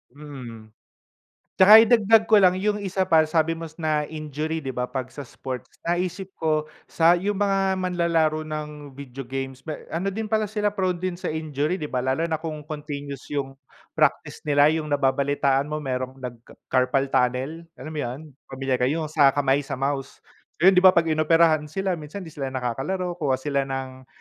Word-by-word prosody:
Mm. 125 -7 -10 0.9
Tsaka 210 +4 +10
idagdag 225 -1 +5
ko 215 - +8
lang 185 -2 +5
yung 205 +2 0
isa 190 -1 -1
pa 160 -4 +4
sabi 160 0 +1
mo 165 0 -4 0.2
na 150 -1 +1
injury, 155 +1 -4
'di 135 - -4
ba, 125 0 -2
'pag 130 -1 -5
sa 140 -2 -9
sports? 130 +1 -7 0.2
Naisip 180 +2 -2
ko 155 -1 0 0.2
sa 170 +1 +4
yung 205 +3 -1
mga 195 -1 +1
manlalaro 165 -4 0
ng 150 -2 -7
video 135 -2 -9
games, 135 +1 -6
may 155 - -5
ano 175 +4 -2
din 215 +2 -5
pala 215 -1 +1
sila, 210 0 -1
prone 185 -3 -1
din 180 -1 -2
sa - - -6
injury, 155 +1 -2
'di 150 -5 -5
ba? 125 - -1
Lalo 130 +5 0
na 160 - 0
kung 155 -2 -6
continuous 145 -2 -7
yung 135 -1 -3 0.4
practice - - +1
nila, 145 +1 +5
yung 160 -1 -2
nababalitaan 140 0 +1
mo 150 0 -4
merong 130 -1 -3
nag-ca 120 -2 -9 0.2
carpal 135 +1 +1
tunnel, 130 +7 0
alam 155 - -9
mo 155 - -5
yun, 125 +5 -6 0.3
pamilyar 135 -1 -2
ka 125 - +2
yung 155 +2 -1
sa 145 -4 +4
kamay 140 -1 +2
sa 135 - -3
mouse. 135 +1 -3 0.4
Ngayon 190 +1 +7
'di - - +4
ba, 185 -1 +8
'pag 165 -1 +2
inoperahan 155 0 +3
sila 185 +2 -2
minsan 155 +6 -8
hindi 165 - -9
sila 135 -2 -5
nakakalaro, 170 +9 -3
kuha 140 -4 +1
sila 140 +1 -1
ng 130 -1 -6
150 Hz, 185 wpm, -24 LUFS, 135-175 Hz, 0.9 s, Tsaka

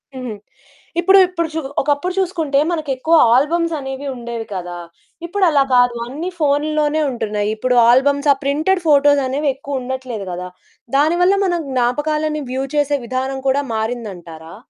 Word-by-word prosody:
హుహు. 255 -3 -5 0.7
ఇప్పుడు 385 +3 +6
ఇప్పుడు 335 -2 -2
చు 320 - -1 0.2
ఒకప్పుడు 290 +6 -1
చూసుకుంటే, 325 -7 0
మనకెక్కువ 310 -1 0 0.2
ఆల్బమ్సనేవి 285 -1 0
ఉండేవి 235 -2 -6
కదా! 180 -2 -5 0.5
ఇప్పుడలా 340 -6 +2
కాదు 245 -1 +4
అన్ని 305 +8 -5
ఫోనుల్లోనే 300 +1 +1
ఉంటున్నాయి. 210 -4 -2
ఇప్పుడు 250 +3 0
ఆల్బమ్స్, 280 +3 +3
ఆ - - -8
ప్రింటెడ్ 310 +7 +1
ఫోటోసనేవెక్కువుండట్లేదు 270 -4 0
గదా! 180 +1 -6 0.5
దాని 310 +4 +3
వల్ల 380 +2 +4
మనం 350 -2 0
జ్ఞాపకాలని 300 +5 0
వ్యూ 260 +1 -2
చేసే 290 -1 +1
విధానం 260 +2 -3
కూడా 280 +2 +1
మారిందంటారా? 190 -8 -6
280 Hz, 125 wpm, -18 LUFS, 245-310 Hz, 0.7 s, ఇప్పుడు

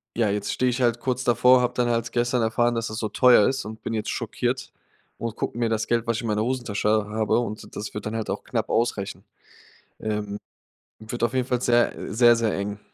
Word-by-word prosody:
ja, 115 -3 +2
jetzt 100 0 -1
stehe 130 - +1
ich 125 +1 -2
halt 120 -1 +2
kurz 130 0 -1
davor, 125 +2 +5
habe 125 - 0
dann 120 -1 +1
halt 115 0 0
gestern 120 +1 +1
erfahren, 120 +1 +1
dass 115 0 -1
das 110 - -6
so 110 - -2
teuer 125 -5 +6
ist 135 -2 -3
und 110 +1 -8
bin 115 - -3
jetzt 110 - -2
schockiert - - -2 0.5
und 115 -2 -4
gucke - - -4
mir 120 -1 +1
das 110 -1 -1
Geld, 115 -1 0
was 115 -1 +1
ich - - -3
in - - -3
meiner 105 0 +1
Hosentasche 120 -5 -1 0.2
habe. 110 +2 +1
Und 110 -3 -6
das 105 - -5
wird 105 - -6
dann 110 - -4
halt 110 - -3
auch - - -3
knapp - - -2
ausreichen. 110 -4 -1 0.7
Ähm. 105 -1 -3 0.6
Wird 110 +2 -6
auf 120 - 0
jeden 130 -1 +1
Fall 125 -1 0
sehr 120 0 +3 0.2
sehr, 120 0 +6
sehr 115 -2 0
eng. 100 +1 -4
115 Hz, 225 wpm, -24 LUFS, 110-120 Hz, 0.7 s, teuer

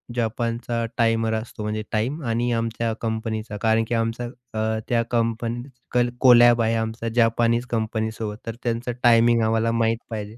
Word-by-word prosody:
जापानचा 115 0 -2
timer 115 -1 +2
असतो 110 -1 -5
म्हणजे 105 0 -2
time 125 +9 -1
आणि 120 +1 0
आमच्या 115 0 -1
कंपनीचा. 110 -1 -3
कारण 110 0 +3
की 120 - -1
आमचा 115 +1 -1 0.3
अ, 110 0 -1
त्या 120 -1 +2
कंपनी 115 0 -1 0.3
कल 120 0 +2
कोलॅब 120 -2 +7
आहे 115 0 +1
आमचा 115 +1 -3
जापानीज 115 0 +2
कंपनीसोबत 110 -1 -2
तर 115 0 -5
त्यांचं 120 +1 -2
टायमिंग 115 -1 +5
आम्हाला 115 +1 +1
माहीत 115 0 +1
पाहिजे. 110 0 -6
115 Hz, 150 wpm, -23 LUFS, 110-120 Hz, 0.3 s, कोलॅब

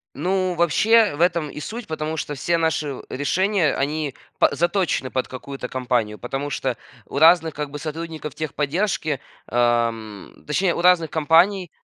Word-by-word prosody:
Ну, 185 +3 0
вообще 205 +5 +4
в 145 - -8
этом 170 -3 +2
и 150 - -8
суть, 230 +8 -6
потому 155 0 -3
что 150 -1 -4
все 170 +5 0
наши 155 -4 -1
решения, 180 +4 +1
они 145 0 -2 0.2
па - - +5
заточены 175 -5 0
под 130 0 -2
какую-то 130 0 -7
компанию. 120 -5 -1
Потому 135 +4 -4
что 130 -3 -2 0.3
у - - -4
разных 165 0 +5
как 150 -1 -4
бы 145 - -6
сотрудников 155 -1 -6
техподдержки, 155 0 -1 0.3
ам, 115 -3 0
точнее, 175 +4 +1
у - - -3
разных 175 -3 +4
компаний, 170 +4 +3
155 Hz, 150 wpm, -22 LUFS, 135-175 Hz, 0.3 s, па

